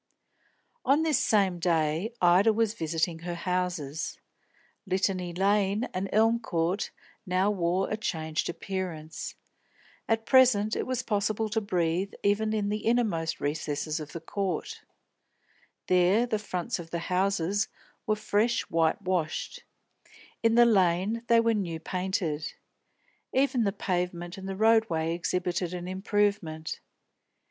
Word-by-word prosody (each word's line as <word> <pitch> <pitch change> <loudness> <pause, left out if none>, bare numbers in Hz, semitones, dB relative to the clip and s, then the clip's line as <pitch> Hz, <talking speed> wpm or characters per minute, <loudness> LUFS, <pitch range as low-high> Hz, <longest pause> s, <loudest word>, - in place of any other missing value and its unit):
On 285 +4 +3
this 310 -5 +2
same 195 -5 +2
day, 165 +3 +1
Ida 180 +5 +6
was 220 -1 +1
visiting 165 -2 -1
her 175 +1 -5
houses. 170 -4 -2 0.7
Litany 185 -1 0
Lane 200 +3 +2
and 190 +1 -2
Elm 225 +2 +4
Court 175 -2 -1 0.3
now 190 +1 +1
wore 180 -1 0
a 215 - -2
changed 160 -7 -2
appearance. 175 -4 -5 0.7
At 225 0 +1
present 235 -5 +5
it - - -2
was 255 -1 -1
possible 215 0 0
to 220 +1 0
breathe 180 -1 0
even 210 +2 +2
in 210 -2 0
the 210 +1 -2
inmost 220 -9 +1
recesses 150 +1 -2
of 150 -1 -7
the 170 - -4
Court. 185 +1 -3 1.0
There 185 +6 +4
the 220 -3 -1
fronts 180 -5 -3
of 165 -1 -8
the 170 - -2 0.2
houses 195 +1 +1 0.4
were 215 - +3
fresh 215 +2 +1
white 165 +3 +2
washed; 185 - -2 0.8
in 230 0 +3
the 240 0 +7
Lane 195 +1 +2
they 230 0 +5
were 230 0 +3
new 175 -6 -2
painted. 180 -4 -2 0.8
Even 260 -3 +2
the 200 - +2
pavement 180 -3 -2
and 195 0 -7
the 195 - -3
road 220 +2 +4
way 160 0 0
exhibited 175 +1 -1
an 175 0 -5
improvement. 190 -5 -1
190 Hz, 135 wpm, -28 LUFS, 170-215 Hz, 1.0 s, the